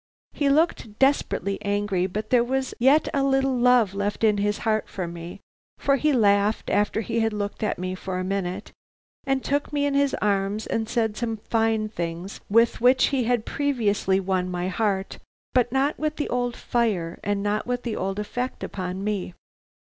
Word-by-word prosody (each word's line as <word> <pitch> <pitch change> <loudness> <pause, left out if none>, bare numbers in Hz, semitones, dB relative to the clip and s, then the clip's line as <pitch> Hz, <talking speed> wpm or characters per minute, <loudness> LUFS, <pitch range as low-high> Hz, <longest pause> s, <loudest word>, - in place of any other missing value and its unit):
"He 285 -1 +1
looked 275 -8 +1
desperately 265 -7 +1
angry, 200 -2 0
but 215 +3 -5
there 245 -2 +5
was 260 +1 -1
yet 275 +5 +4
a 275 - +2
little 270 -1 +2
love 245 -5 +4
left 200 +2 -2
in 210 -2 +4
his 205 +1 0
heart 215 -1 +1
for 185 -3 -4
me, 170 +3 -8 0.4
for 275 0 +2
he 305 +3 +2
laughed 205 -3 +2
after 205 +2 +1
he 230 +1 -2
had 225 -1 +1
looked 205 -1 -4
at 215 - 0
me 185 +1 -3
for 185 0 -4
a 185 - -2
minute, 190 0 -3 0.6
and 270 -1 +1
took 285 +2 -1
me 290 -1 0
in 285 - 0
his 280 0 +2
arms 200 +1 0
and 225 0 -2
said 225 -3 0
some 230 0 -2
of 215 -1 -9
the - - -34
fine 225 -1 +1
things 175 -1 -5
with 230 +2 +3
which 250 +2 +5
he 265 -4 0
had 240 -2 +1
previously 210 -9 +1
won 185 -1 -1
my 180 0 -2
heart, 195 -1 -1 0.3
but 245 -2 +3
not 270 +3 +1
with 305 0 -1
the 295 - -3
old 245 -1 -1
fire 205 -9 -1
and 205 0 -1
not 210 +2 -1
with 245 0 -2
the 235 -3 -3
old 195 +1 -2
effect 245 +5 -4
upon 185 0 -4
me. 200 -4 -3
215 Hz, 195 wpm, -25 LUFS, 195-250 Hz, 0.6 s, there